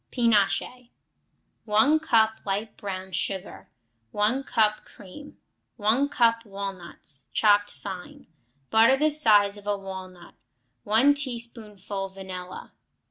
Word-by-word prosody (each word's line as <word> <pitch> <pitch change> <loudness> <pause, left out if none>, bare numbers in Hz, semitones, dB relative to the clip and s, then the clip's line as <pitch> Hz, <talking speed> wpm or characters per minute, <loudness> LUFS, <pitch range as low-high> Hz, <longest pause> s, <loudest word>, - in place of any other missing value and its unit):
Pinoche 235 +1 +1 0.8
1 255 +9 +3
cup 220 -7 +2
light 205 +2 -3
brown 190 -1 -6
sugar. 190 +2 -4 0.4
1 215 - 0
cup 215 -1 +1
cream. 210 +10 -14 0.4
1 235 +6 +2
cup 230 -3 +2
walnuts, 190 - -8
chopped 205 -1 +3
fine. 190 -3 -9 0.5
Butter 225 +4 +5
the 305 +2 +2
size 210 -8 +4
of 205 0 -13
a 205 -1 0
walnut. 185 -2 -10 0.5
1 230 +7 +4
teaspoonful 225 -7 -6
vanilla. 185 -1 -9
210 Hz, 105 wpm, -25 LUFS, 195-235 Hz, 0.8 s, Butter